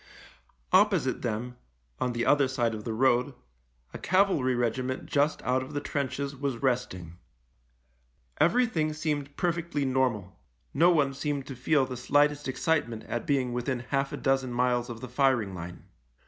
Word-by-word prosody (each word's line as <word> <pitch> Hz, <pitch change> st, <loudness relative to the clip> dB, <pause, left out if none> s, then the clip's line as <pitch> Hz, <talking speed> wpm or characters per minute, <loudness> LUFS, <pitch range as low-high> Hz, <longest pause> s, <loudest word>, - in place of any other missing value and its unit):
Opposite 185 Hz, -9 st, +3 dB
them, 120 Hz, +1 st, -3 dB, 0.4 s
on 125 Hz, -, -1 dB
the 120 Hz, 0 st, -1 dB
other 145 Hz, -2 st, +4 dB
side 120 Hz, -3 st, 0 dB
of 105 Hz, -1 st, -7 dB
the 115 Hz, -, -2 dB
road, 125 Hz, +3 st, +2 dB, 0.6 s
a -, -, -7 dB
cavalry 185 Hz, -9 st, +2 dB
regiment 125 Hz, +2 st, -1 dB
just 145 Hz, +2 st, 0 dB
out 130 Hz, +1 st, +1 dB
of 130 Hz, +3 st, -8 dB
the 145 Hz, -, -1 dB
trenches 140 Hz, -1 st, -3 dB
was 135 Hz, -2 st, -2 dB
resting. 95 Hz, -10 st, -2 dB, 1.2 s
Everything 170 Hz, -7 st, +2 dB
seemed 150 Hz, -2 st, -3 dB
perfectly 170 Hz, -4 st, -1 dB
normal 125 Hz, -9 st, 0 dB, 0.2 s
— -, -, -43 dB
no 165 Hz, +5 st, +5 dB
one 145 Hz, -5 st, +2 dB
seemed 140 Hz, -1 st, -3 dB
to 135 Hz, -, -7 dB
feel 135 Hz, +2 st, +2 dB
the 130 Hz, -1 st, -6 dB
slightest 145 Hz, +3 st, +2 dB
excitement 130 Hz, -5 st, -1 dB
at 120 Hz, -, -4 dB
being 130 Hz, -4 st, +1 dB
within 125 Hz, +1 st, -2 dB
half 140 Hz, 0 st, 0 dB
a -, -, -4 dB
dozen 135 Hz, -2 st, 0 dB
miles 120 Hz, 0 st, +1 dB
of 115 Hz, -1 st, -7 dB
the 130 Hz, -, -6 dB
firing 125 Hz, -5 st, +1 dB
line. 85 Hz, -1 st, -8 dB
130 Hz, 160 wpm, -28 LUFS, 120-145 Hz, 1.2 s, no